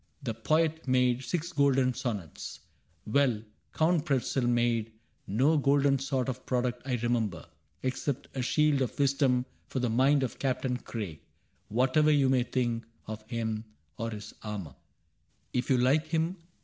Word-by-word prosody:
The 120 Hz, -4 st, -2 dB
poet 155 Hz, +7 st, +1 dB
made 125 Hz, 0 st, +3 dB
Six 170 Hz, +6 st, -2 dB
golden 135 Hz, -3 st, +3 dB
sonnets. 110 Hz, -, -5 dB, 0.4 s
Well, 115 Hz, -2 st, +2 dB, 0.3 s
Count 160 Hz, -1 st, +2 dB
Pretzel 135 Hz, -4 st, 0 dB
made 120 Hz, -2 st, +1 dB, 0.3 s
No 135 Hz, +10 st, +3 dB
golden 140 Hz, 0 st, +3 dB
sort 135 Hz, -1 st, -1 dB
of 130 Hz, -1 st, -4 dB
product 125 Hz, -1 st, 0 dB
I 130 Hz, -, +1 dB
remember 115 Hz, -6 st, -1 dB, 0.4 s
Except 130 Hz, +1 st, -2 dB
a 130 Hz, -, -1 dB
shield 150 Hz, +2 st, +2 dB
of 130 Hz, -, -2 dB
wisdom 135 Hz, -3 st, +2 dB, 0.2 s
for -, -, -5 dB
the 125 Hz, -3 st, +1 dB
mind 135 Hz, +4 st, +4 dB
Of 125 Hz, -, -4 dB
Captain 130 Hz, -1 st, 0 dB
Craig 100 Hz, -11 st, -6 dB, 0.3 s
— -, -, -42 dB
whatever 130 Hz, +7 st, +3 dB
you 140 Hz, -3 st, +4 dB
may 130 Hz, -1 st, +4 dB
think 120 Hz, -2 st, -1 dB, 0.2 s
Of 110 Hz, 0 st, -6 dB
him 110 Hz, -2 st, -2 dB, 0.4 s
or 115 Hz, -, -1 dB
of 115 Hz, -, -4 dB
his 105 Hz, -1 st, -8 dB
armor. 100 Hz, -, -5 dB, 0.8 s
If 125 Hz, 0 st, -1 dB
you 130 Hz, -, +5 dB
like 140 Hz, +6 st, +3 dB
him. 165 Hz, +3 st, 0 dB
130 Hz, 155 wpm, -29 LUFS, 115-140 Hz, 0.8 s, you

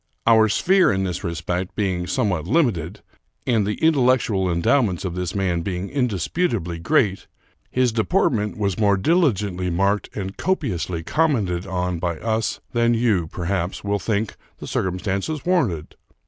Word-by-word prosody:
Our 110 Hz, -1 st, +5 dB
sphere 185 Hz, -, +4 dB
in 95 Hz, 0 st, 0 dB
this 90 Hz, 0 st, -3 dB
respect 90 Hz, +1 st, -3 dB
being 95 Hz, -4 st, -1 dB
somewhat 90 Hz, -7 st, 0 dB
limited, 105 Hz, -, 0 dB, 0.4 s
and 110 Hz, -5 st, +2 dB
the 105 Hz, -, -1 dB
intellectual 125 Hz, -, +2 dB
endowments 90 Hz, +2 st, +1 dB
of 90 Hz, -, -3 dB
this 90 Hz, 0 st, -3 dB
man 90 Hz, -4 st, 0 dB
being 90 Hz, +2 st, -4 dB
indisputably 115 Hz, -, -1 dB
great, 100 Hz, -, +1 dB, 0.4 s
his 125 Hz, -1 st, +2 dB
deportment 110 Hz, -, +1 dB
was 100 Hz, -2 st, -1 dB
more 100 Hz, -2 st, +3 dB
diligently 100 Hz, -, +1 dB
marked 100 Hz, +4 st, +1 dB
and 95 Hz, -1 st, -4 dB
copi 160 Hz, -, 0 dB
ously 85 Hz, -1 st, -3 dB
commented 100 Hz, -, 0 dB
on 90 Hz, -2 st, -2 dB
by 85 Hz, -1 st, -2 dB
us 110 Hz, +3 st, -1 dB
than 120 Hz, 0 st, +3 dB
you, 110 Hz, -8 st, +1 dB
perhaps, 90 Hz, +1 st, -3 dB
will 100 Hz, 0 st, 0 dB
think 110 Hz, -1 st, -2 dB, 0.2 s
the -, -, -8 dB
circumstances 95 Hz, -, -2 dB
warranted. 130 Hz, -, 0 dB
100 Hz, 145 wpm, -22 LUFS, 90-120 Hz, 0.4 s, Our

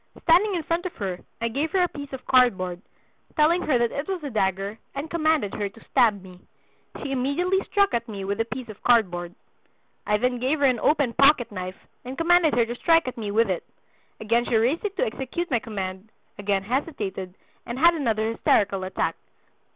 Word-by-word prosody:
Standing 365 Hz, +4 st, +4 dB
in 335 Hz, -, -2 dB
front 340 Hz, +4 st, -1 dB
of 360 Hz, -, -10 dB
her 185 Hz, -3 st, -4 dB, 0.2 s
I 230 Hz, -, +1 dB
gave 280 Hz, +7 st, -1 dB
her 375 Hz, -2 st, +4 dB
a -, -, +2 dB
piece 285 Hz, -4 st, -9 dB
of 265 Hz, -1 st, -8 dB
card 250 Hz, -6 st, +4 dB
board, 180 Hz, -1 st, -5 dB, 0.5 s
telling 330 Hz, +3 st, +3 dB
her 295 Hz, -7 st, +2 dB
that 235 Hz, -1 st, +1 dB
it 280 Hz, -, -4 dB
was 375 Hz, -4 st, -3 dB
a 285 Hz, -, -4 dB
dagger, 195 Hz, 0 st, -1 dB, 0.2 s
and 285 Hz, +3 st, -5 dB
commanded 310 Hz, -10 st, +1 dB
her 205 Hz, -1 st, -2 dB
to 225 Hz, +3 st, -18 dB
stab 205 Hz, -5 st, +3 dB
me. 180 Hz, -1 st, -13 dB, 0.6 s
She 280 Hz, -, -4 dB
immediately 285 Hz, +9 st, +1 dB
struck 400 Hz, -1 st, +2 dB
at 235 Hz, 0 st, -1 dB
me 200 Hz, -2 st, -5 dB
with 200 Hz, +2 st, -2 dB
the 225 Hz, -, +1 dB
piece 245 Hz, +1 st, -6 dB
of 215 Hz, -2 st, -11 dB
card 230 Hz, -6 st, +4 dB
board. 175 Hz, 0 st, -6 dB, 0.7 s
I 210 Hz, -, +3 dB
then 250 Hz, +2 st, 0 dB
gave 265 Hz, +5 st, +1 dB
her 285 Hz, -, +2 dB
an 255 Hz, -3 st, +3 dB
open 285 Hz, -4 st, +2 dB
pocketknife 230 Hz, -11 st, +2 dB, 0.3 s
and 255 Hz, +2 st, -7 dB
commanded 335 Hz, -2 st, +4 dB
her 235 Hz, -1 st, +3 dB
to 235 Hz, -, -4 dB
strike 330 Hz, 0 st, +3 dB
at 255 Hz, -, -4 dB
me 215 Hz, -3 st, -4 dB
with 215 Hz, 0 st, +2 dB
it. 175 Hz, -, -2 dB, 0.6 s
Again 230 Hz, +2 st, +1 dB
she 240 Hz, -, 0 dB
raised 245 Hz, +9 st, +2 dB
it 405 Hz, -2 st, -4 dB
to -, -, +2 dB
execute 340 Hz, -, -4 dB
my 240 Hz, -, +3 dB
command, 195 Hz, -3 st, -6 dB, 0.3 s
again 200 Hz, -1 st, 0 dB
hesitated, 205 Hz, -, -3 dB, 0.3 s
and 235 Hz, -, -4 dB
had 340 Hz, +5 st, +6 dB
another 225 Hz, -8 st, 0 dB
hysterical 195 Hz, -4 st, +1 dB
attack. 185 Hz, -, -1 dB
240 Hz, 205 wpm, -25 LUFS, 205-305 Hz, 0.7 s, had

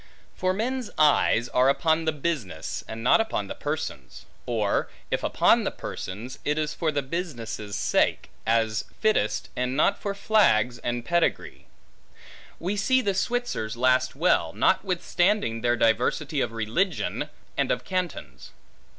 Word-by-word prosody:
For 185 Hz, -, 0 dB
men's 240 Hz, +4 st, -2 dB
eyes 145 Hz, -6 st, +4 dB
are 125 Hz, +2 st, +3 dB
upon 160 Hz, +4 st, +2 dB
the 160 Hz, -, +2 dB
business, 140 Hz, -, -3 dB
and 110 Hz, +1 st, -6 dB
not 125 Hz, -, +5 dB
upon 220 Hz, -, -2 dB
the -, -, -6 dB
persons; 145 Hz, -, -5 dB, 0.2 s
or 110 Hz, -4 st, 0 dB, 0.2 s
if -, -, 0 dB
upon -, -, +4 dB
the -, -, 0 dB
persons, 110 Hz, +7 st, -7 dB
it 150 Hz, +1 st, 0 dB
is 155 Hz, -1 st, -1 dB
for 160 Hz, -3 st, -1 dB
the 145 Hz, -2 st, -1 dB
business' 120 Hz, -, -5 dB
sake, -, -, +1 dB
as 110 Hz, -2 st, +1 dB
fittest, 215 Hz, -1 st, +1 dB
and 125 Hz, +1 st, -1 dB
not 200 Hz, +6 st, +3 dB
for 200 Hz, -1 st, -3 dB
flags 125 Hz, -, +3 dB
and 120 Hz, 0 st, -3 dB
pedigree. 170 Hz, +3 st, -1 dB, 0.9 s
We 190 Hz, +5 st, -2 dB
see 260 Hz, +5 st, +3 dB
the 200 Hz, -4 st, 0 dB
Switzers 195 Hz, -, -2 dB
last 130 Hz, +1 st, +2 dB
well, 170 Hz, +6 st, +2 dB
notwithstanding 180 Hz, -, +1 dB
their 120 Hz, 0 st, +2 dB
diversity 120 Hz, +6 st, +1 dB
of 115 Hz, -, -1 dB
religion, 115 Hz, -, -1 dB, 0.3 s
and -, -, 0 dB
of -, -, 0 dB
cantons. 180 Hz, -, -4 dB
145 Hz, 140 wpm, -26 LUFS, 115-185 Hz, 0.9 s, not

